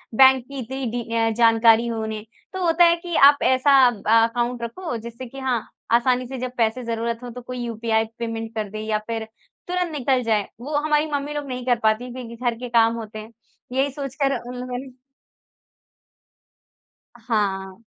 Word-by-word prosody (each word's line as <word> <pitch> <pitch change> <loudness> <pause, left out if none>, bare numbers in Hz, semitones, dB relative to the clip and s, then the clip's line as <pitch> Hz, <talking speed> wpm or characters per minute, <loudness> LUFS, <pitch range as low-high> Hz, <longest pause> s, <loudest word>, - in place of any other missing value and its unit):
Bank 265 0 +6
की 275 -1 -7
इतनी 260 +2 -4
D 240 0 -3
अ, 225 0 +2
जानकारी 230 0 +5
हो 230 -1 -2
उन्हें। 220 -1 -5 0.3
तो 375 -1 -2
होता 335 +1 +5
है 340 0 +5
कि 345 0 -6
आप 285 +1 +7
ऐसा 260 0 +5
बा 225 0 +3
अकाउंट 240 +1 -2
रखो 245 +3 -4
जिससे 235 +3 -8
कि 270 +3 -10
हाँ 255 -3 0 0.3
आसानी 250 +1 +2
से 265 +1 -6
जब 255 0 -3
पैसे 230 +2 +1
ज़रूरत 230 0 -2
हो 245 - -6
तो 250 +1 -8
कोई 250 +1 -7
यूपीआई 225 -1 0
पेमेंट 225 -1 -4
कर 215 -2 -3
दे 215 +2 -6
या 215 -1 +1
फ़िर 225 -1 -3 0.4
तुरंत 360 -1 -1
निकल 265 -3 +1
जाए। 215 -3 +1
वो 290 +4 -4
हमारी 300 0 +2
मम्मी 285 0 -2
लोग 295 -1 -4
नहीं 250 -1 -5
कर 245 -2 +2
पातीं 220 +3 +1
क्योंकि 240 -2 -8
घर 240 0 -1
के 250 0 -6
काम 230 -1 +4
होते 220 -1 -7
हैं। 215 +1 -10 0.4
यही 270 +2 +1
सोचकर 275 0 -2
अ, 255 -4 -2
मैंने 250 +1 -6 2.3
हाँ। 200 -3 -2
240 Hz, 185 wpm, -23 LUFS, 225-265 Hz, 2.3 s, आप